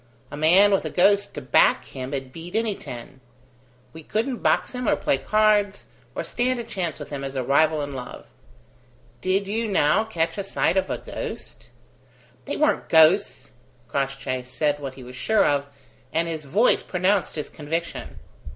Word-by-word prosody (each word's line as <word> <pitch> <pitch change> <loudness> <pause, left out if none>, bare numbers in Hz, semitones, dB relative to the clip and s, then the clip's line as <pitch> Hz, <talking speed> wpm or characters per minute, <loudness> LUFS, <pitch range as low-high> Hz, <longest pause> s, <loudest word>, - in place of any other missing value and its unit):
A - - -6
man 175 +7 +5
with 195 - +2
a - - -3
ghost 200 +2 +2
to 150 - -5
back 130 - +3
him'd 135 0 -6
beat 170 +4 -9
any 225 -1 +1
ten. 125 -5 -10 0.7
We 160 - -10
couldn't 230 - -2
box - - +1
him 250 -2 -2
or - - +4
play 135 - 0
cards, 210 +1 +2 0.3
or - - -2
stand 250 +1 -1
a - - -3
chance 185 -8 -4
with - - -9
him 140 -1 -4
as 135 0 -5
a 130 - -1
rival 150 +3 +3
in 145 0 -6
love. 125 -2 -8 1.0
Did 195 +1 0
you, 225 +3 -1
now, 185 -1 +3
catch 165 -5 -2
a - - -2
sight 190 - 0
of 190 -1 +1
a - - -1
ghost?" - - -7 0.8
"They - - -3
weren't 305 - +1
ghosts!" 160 - +4 0.3
Crossjay 135 0 -2
said 135 +4 -1
what 135 -2 -6
he 130 - -11
was 125 +1 -10
sure 220 +11 +2
of, 140 -1 +1 0.4
and 165 +1 0
his 160 -2 -5
voice 205 - +3
pronounced 185 +2 0
his 150 - -3
conviction. 165 +3 -5
165 Hz, 175 wpm, -24 LUFS, 140-205 Hz, 1.0 s, man